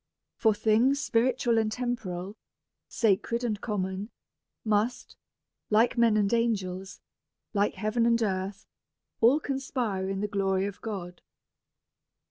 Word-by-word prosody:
For 220 -2 +3
things 230 +6 +3
spiritual 235 -2 +2
and 220 -1 0
tem 245 +1 -1
poral, 185 -3 -6 0.5
sacred 230 +2 +1
and 215 -4 -2
common, 195 -1 -3 0.6
must, 220 +4 0 0.5
like 220 +3 +3
men 230 -3 +4
and 205 +1 +1
angels, 195 -5 -1 0.5
like 205 0 +1
heaven 230 +2 +1
and 230 0 +3
earth, 190 -1 -3 0.5
all 245 +6 +5
conspire 250 -9 -2
in 195 0 -2
the 210 - 0
glory 195 -1 0
of 200 -1 -6
God. 185 -5 -6
215 Hz, 120 wpm, -28 LUFS, 195-235 Hz, 0.6 s, all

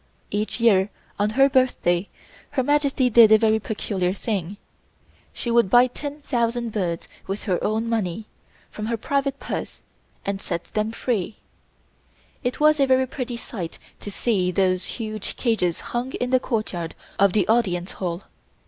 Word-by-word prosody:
Each 210 +3 -2
year, 205 -4 +4 0.3
on 205 +1 +2
her 270 0 +7
birthday, 245 -9 +2 0.4
Her 260 - 0
Majesty 280 -2 +2
did 230 -2 +7
a 220 - +9
very 220 0 +3
peculiar 195 -4 -2
thing. 200 -3 -3 0.7
She 235 - -4
would 235 -4 +4
buy 245 +4 +7
10,000 245 -4 -2
birds 175 -6 -2 0.2
with 195 +2 -4
her 185 -5 -1
own 220 +2 0
money, 220 -3 -1 0.5
from 215 0 -5
her 230 0 -1
private 275 +3 -1
purse - - -5 0.4
and 195 -1 -2
set 170 -2 -3
them 215 +1 0
free. 225 -4 -2 1.1
It 245 - -2
was 305 0 +5
a 275 - +4
very 260 0 +4
pretty 250 -2 -5
sight 180 -8 -6 0.2
to - - -7
see 195 -3 0
those 185 -1 +1
huge 215 -3 -4
cages 205 -9 0
hung 245 +2 -2
in 250 0 -2
the 255 - +5
courtyard 215 -10 -3 0.2
of 200 -1 +5
the 210 - +2
Audience 190 -6 +1
Hall. 175 0 -4
220 Hz, 155 wpm, -24 LUFS, 195-245 Hz, 1.1 s, a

